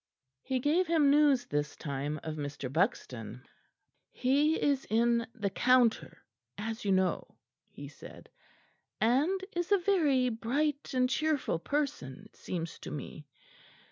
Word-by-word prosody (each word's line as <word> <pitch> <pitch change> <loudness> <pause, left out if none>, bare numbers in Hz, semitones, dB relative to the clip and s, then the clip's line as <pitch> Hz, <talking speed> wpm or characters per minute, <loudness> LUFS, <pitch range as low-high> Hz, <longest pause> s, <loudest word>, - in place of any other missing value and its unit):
He 260 -1 -2
gave 310 +8 +1
him 310 -4 +4
news 285 -4 +4
this 145 -6 -2
time 145 +1 -4
of 155 -1 -4
Mr. 145 -3 -5
Buxton. 125 - -2 0.7
"He 290 +5 +2
is 280 -2 +1
in 235 +1 +2
the 205 -4 -2
Counter, 245 +1 +2 0.3
as 225 +2 -5
you 200 - 0
know," 190 -1 0 0.3
he - - -10
said, - - -13 0.7
"and 295 - +2
is 350 +2 -2
a 405 - +6
very 315 -10 +2
bright 275 +6 -2
and 255 0 +3
cheerful 290 - 0
person, 265 - -3
it - - -20
seems 170 -2 -5
to - - -8
me. 150 +1 -8
245 Hz, 135 wpm, -31 LUFS, -, 0.7 s, a